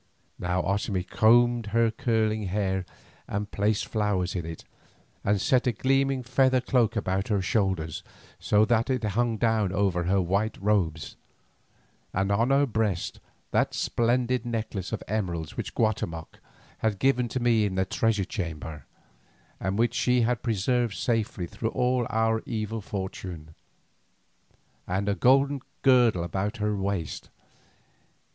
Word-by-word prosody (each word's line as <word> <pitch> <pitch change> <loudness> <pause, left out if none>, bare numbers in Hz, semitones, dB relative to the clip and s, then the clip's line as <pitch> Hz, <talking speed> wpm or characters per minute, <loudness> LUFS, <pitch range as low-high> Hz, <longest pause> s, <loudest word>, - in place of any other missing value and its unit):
Now 90 0 0
Otomie 95 -1 -1
combed 120 0 +4
her 115 +1 +2
curling 110 -2 0
hair 95 -1 -1 0.4
and 105 0 -3
placed 105 +1 0
flowers 100 -5 -1
in 85 -3 -3
it, 80 -1 -7 0.6
and 100 0 +2
set 125 +5 +2
a - - +4
gleaming 135 +3 +1
feather 130 +1 +3
cloak 120 -3 +1
about 95 -2 -1
her 105 -3 +1
shoulders, 95 -5 -1 0.4
so 105 +1 +3
that 115 +1 +1
it 130 -3 0
hung 115 +2 0
down 110 -4 +1
over 95 -3 +1
her 95 +2 +2
white 100 +5 0
robes, 95 -7 0 1.0
and 95 +2 +1
on 115 +5 +2
her 140 +1 +4
breast 110 -7 -1 0.3
that - - +1
splendid 120 +1 +1
necklace 110 -5 -4
of - - -3
emeralds 90 -7 -3
which - - -5
Guatemoc 85 -7 -2 0.4
had 110 -2 0
given 125 +2 +2
to 130 - -3
me 120 -3 +3
in 95 - -4
the 95 0 +1
treasure 110 -2 0
chamber, 80 -6 -6 0.7
and 95 +1 -2
which 120 +1 +2
she 125 0 +2
had 120 +1 +1
preserved 120 0 0
safely 110 -6 -1
through 110 +6 -3
all 125 -1 +1
our 110 0 +1
evil 110 -1 -3
fortune, 95 -5 -6 1.3
and 95 +3 -1
a 100 - +2
golden 135 +5 +3 0.2
girdle 120 -9 +4
about 95 +4 -2
her 105 -1 0
waist. 95 -5 -3
105 Hz, 140 wpm, -27 LUFS, 95-120 Hz, 1.3 s, combed